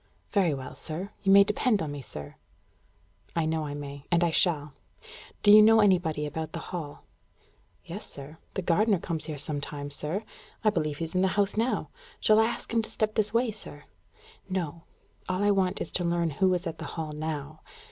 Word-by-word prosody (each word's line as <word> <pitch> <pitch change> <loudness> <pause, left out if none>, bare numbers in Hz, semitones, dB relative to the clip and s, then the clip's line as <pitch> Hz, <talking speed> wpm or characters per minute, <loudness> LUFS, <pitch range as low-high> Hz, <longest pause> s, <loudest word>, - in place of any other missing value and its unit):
"Very 185 -8 +3
well, 130 -1 -7
sir. 180 +6 -5
You 195 - +3
may 200 0 +9
depend 210 +2 +1
on 155 -4 -3
me, 145 -1 -6
sir." 75 - -8 1.0
"I 165 - +1
know 160 -1 -1
I 145 - -5
may, 140 -1 -8
and 170 0 +4
I 170 - +2
shall. 150 -4 +2 0.7
Do 205 - +7
you 215 +1 +10
know 220 +1 +7
anybody 175 -7 +3
about 160 +1 -5
the 165 - -3
Hall?" 155 -5 -5 0.8
"Yes, 190 +6 -7
sir. 145 +3 -10 0.2
The 190 - -2
gardener 200 +4 +3
comes 165 -2 -4
here 155 -2 -5
sometimes, 145 -1 -4
sir. 160 +9 -3 0.4
I 215 - +5
believe 155 -7 -1
he's 165 0 -4
in 185 - +2
the 190 - +4
house 200 -1 +2
now. 230 +4 0 0.3
Shall 215 0 +5
I 220 - +5
ask 235 - -5
him 230 - +3
to 220 - -7
step 215 -1 -1
this 215 -1 +1
way, 230 0 +2
sir?" 145 -8 -10 0.7
"No. 170 -3 -3 0.4
All 185 +2 0
I 205 - +4
want 190 -1 +1
is - - -3
to 180 - 0
learn 170 -1 +1
who 185 +6 +2
is 180 +1 -3
at 165 - -5
the - - -5
Hall 160 -2 -3
now. 155 0 -5
170 Hz, 200 wpm, -28 LUFS, 150-200 Hz, 1.0 s, you